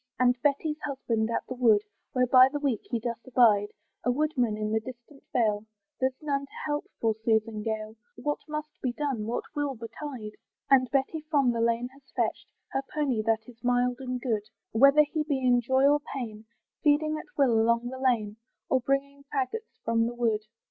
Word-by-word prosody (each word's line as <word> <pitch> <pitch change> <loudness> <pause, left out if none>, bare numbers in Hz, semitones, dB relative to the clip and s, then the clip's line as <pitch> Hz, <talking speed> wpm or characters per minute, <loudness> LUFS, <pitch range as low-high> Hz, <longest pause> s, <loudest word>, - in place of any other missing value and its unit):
And 250 -1 +4
Betty's 300 +3 +1
husband's 230 -6 -1
at - - -1
the - - -4
wood, 225 -5 +4 0.3
Where 255 -1 +3
by 255 +1 +7
the 290 - -2
week 275 -7 0
he 240 - 0
doth 235 0 -3
abide, 225 -5 +4 0.4
A - - +1
woodman 250 -5 +1
in 215 0 -2
the 220 - +2
distant 255 +4 -11
vale; 215 -3 +1 0.4
There's 260 0 0
none 280 -2 -1
to - - -29
help 295 -1 -1
poor 225 -1 +2
Susan 220 -1 +1
Gale, 220 0 -3 0.2
What 295 +5 -2
must 305 0 -4
be 250 -2 -1
done? 260 -6 -2
what 235 - -2
will 290 -2 -1
betide? 230 0 -7 0.4
And 255 -2 +5
Betty 280 +3 0
from 280 -5 +3
the 230 -1 -1
lane 235 +1 +1
has 275 +2 -20
fetched - - -1 0.2
Her 270 - -1
pony, 275 -7 0
that 225 -1 +1
is 245 -1 -15
mild 245 0 +2
and 255 -1 -3
good, 220 -4 -2 0.2
Whether 275 +6 +6
he 305 +1 -2
be 295 -2 0
in 250 -2 +3
joy 260 +3 +3
or 290 +1 +4 0.2
pain, 220 -4 -5 0.4
Feeding 310 +1 +2
at - - -14
will 275 -4 +4
along 235 +1 +2
the 260 0 -7
lane, 225 -5 +1 0.3
Or 260 - +3
bringing 280 +2 -1
faggots 370 - -3
from 230 0 +2
the 240 - -5
wood. 225 -3 +1
250 Hz, 190 wpm, -28 LUFS, 230-280 Hz, 0.4 s, by